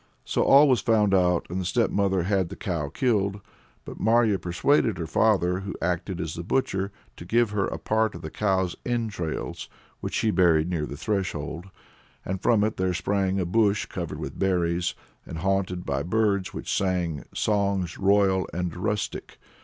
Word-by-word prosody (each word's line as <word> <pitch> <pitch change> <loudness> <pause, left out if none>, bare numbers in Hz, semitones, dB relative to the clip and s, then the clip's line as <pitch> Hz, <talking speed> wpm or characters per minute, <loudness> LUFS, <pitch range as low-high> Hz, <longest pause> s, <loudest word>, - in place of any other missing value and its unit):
So - - 0
all 140 +2 +7
was 130 -4 +3
found 110 -5 +3
out, 90 -2 +3
and 90 +2 -3
the - - -3
stepmother 100 -2 +1
had 95 -2 0
the 100 - -7
cow 80 -6 -3
killed. 100 - 0 0.5
But - - -9
Marya 110 -2 +3
persuaded 100 - +1
her 85 - -3
father, 90 0 +2
who 100 +1 -6
acted 90 +1 -2
as 80 -1 -3
the 85 - -5
butcher, 100 -1 -1 0.3
to - - -8
give 115 +4 +2
her 105 -2 0
a - - -4
part 110 -2 0
of 85 - -9
the 80 - -6
cow's 95 -4 0
entrails, 110 -9 -3 0.3
which - - -4
she 110 - +2
buried 85 -3 +3
near 75 -4 -1
the 70 - -7
threshold; 85 -3 -3 0.6
and 95 0 -3
from 110 -3 +3
it 110 0 -1
there 95 -1 0
sprang 95 +1 0
a 90 - 0
bush 105 +2 +2
covered 85 -4 -5
with - - -7
berries, 90 -2 0 0.3
and 80 - -8
haunted 90 0 -1
by - - -1
birds 100 0 0
which - - -3
sang 90 -5 -1
"songs 100 -4 0
royal 95 -1 +3
and 90 -1 -3
rustic." 105 +3 -3
95 Hz, 175 wpm, -26 LUFS, 90-105 Hz, 0.6 s, all